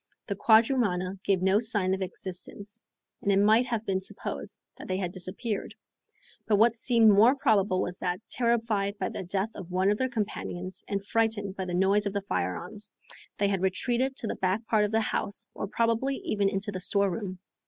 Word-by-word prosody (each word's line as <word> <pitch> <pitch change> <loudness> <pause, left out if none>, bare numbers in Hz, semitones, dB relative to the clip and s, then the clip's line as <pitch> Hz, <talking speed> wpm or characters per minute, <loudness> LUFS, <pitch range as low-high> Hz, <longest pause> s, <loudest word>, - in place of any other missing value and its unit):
The 200 - -3
quadrumana 205 -4 +3
gave 190 -2 +1
no 190 +2 +4
sign 205 -5 0
of 190 - -2
existence, 195 +3 -6 0.4
and 200 - +1
it 195 - +3
might 220 +5 +4
have 230 -3 -2
been 190 -1 0
supposed 190 - -6 0.2
that - - -8
they 185 - -1
had 180 -2 -2
disappeared; 195 +4 -4 0.7
but 215 - +4
what 225 +3 +5
seemed 230 -1 +4
more 220 +7 +6
probable 205 -8 +2
was 180 0 -5
that, 180 -1 -2
terrified 225 -4 0
by - - -2
the - - -5
death 190 +4 -2
of 185 -3 -9
one 185 +2 +2
of 210 - -1
their 260 0 +1
companions, 190 -5 -4
and 200 -1 -3
frightened 210 -3 0
by 190 - -3
the 175 -1 -3
noise 200 +3 +3
of 200 - -3
the 200 - -1
firearms, 195 - -4 0.5
they 200 - +2
had 195 -2 0
retreated 240 +7 0
to - - -4
the - - -1
back 190 +4 -1
part 215 -2 +3
of 205 - -3
the 225 0 +2
house 205 -2 -2
or 200 - -4
probably 230 +5 +1
even 200 -2 +1
into 200 +1 -2
the 185 - -4
store 200 +1 +1
room. 185 0 -4
200 Hz, 195 wpm, -28 LUFS, 190-225 Hz, 0.7 s, more